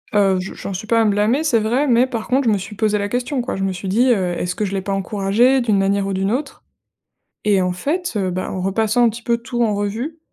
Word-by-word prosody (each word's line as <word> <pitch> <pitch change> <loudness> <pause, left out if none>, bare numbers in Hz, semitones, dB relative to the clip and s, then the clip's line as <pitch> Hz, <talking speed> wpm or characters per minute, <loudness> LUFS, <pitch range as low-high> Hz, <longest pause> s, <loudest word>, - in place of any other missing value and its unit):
Heu, 195 -2 +4
je 190 - -6
j'en 195 - -6
suis 200 +4 -6
pas 230 -1 +3
à - - +3
me 210 - +3
blâmer, 220 +9 +1
c'est 240 -8 +2
vrai, 245 +7 +1
mais 245 +1 +4
par 230 -4 -5
contre 260 +1 +1
je 220 - +4
me - - +1
suis 205 +2 -8
posée 210 0 +1
la 205 0 -2
question, 250 +2 -1
quoi. 245 - -4
Je 195 - -3
me 195 - 0
suis 185 +2 -6
dit, 230 +7 +2
heu: 185 -5 -1
«Est-ce 180 0 -2
que 210 - -1
je 195 - -4
l'ai 195 - -1
pas 195 +1 -3
encouragé 210 +7 +2
d'une 215 -4 +1
manière 195 0 +1
ou 195 - -2
d'une 195 +2 0
autre?» 270 +2 -4 0.8
Et 200 -3 +3
en 180 0 0
fait, 315 - -2
heu, 190 -2 0
bah, 185 +1 -3
en 185 - -4
repassant 220 +5 +2
un - - +4
petit 230 +2 -8
peu 235 0 +1
tout 240 0 -2
en 215 -2 +1
revue, 225 +11 -3
210 Hz, 285 wpm, -19 LUFS, 195-240 Hz, 0.8 s, Heu